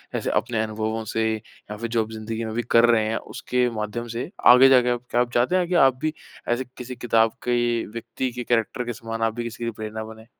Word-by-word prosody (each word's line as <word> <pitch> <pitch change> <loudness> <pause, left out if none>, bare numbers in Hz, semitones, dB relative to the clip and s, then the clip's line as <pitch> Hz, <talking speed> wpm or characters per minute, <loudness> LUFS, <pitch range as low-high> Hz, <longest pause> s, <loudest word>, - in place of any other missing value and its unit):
ऐसे - - -1
अपने 115 -3 0
अनुभवों 110 +1 -3
से 110 +1 -1
या 105 -1 -11
फ़िर 115 +2 -4
जो 115 -1 +1
आप 110 - -10
ज़िंदगी 110 +1 -5
में 110 - -4
अभी 120 +2 -2
कर 115 0 +7
रहे 110 -2 +4
हैं 110 - -1 0.2
उसके 125 -1 0
माध्यम 110 +2 -4
से 125 +6 -3 0.2
आगे 130 +2 +7
जाके 125 -2 +5
आप 120 -1 0
क्या 120 - +3
आप 120 -1 -1
चाहते 125 +9 +2
हैं 180 -1 +1
कि - - -1
आप 130 - 0
भी 155 0 0 0.3
ऐसे 120 +2 0
किसी 125 0 -7
किताब 115 -1 +2 0.2
के 120 -1 +1
व्यक्ति 115 +3 -4
के 125 0 -5
कैरेक्टर 120 +1 0
के 120 - -3
समान 115 0 -6
आप 115 -1 +1
भी 120 - -3
किसी 115 0 -6
की 115 - -1
प्रेरणा 110 0 -6
बने? 110 0 -11
115 Hz, 240 wpm, -24 LUFS, 110-120 Hz, 0.3 s, कर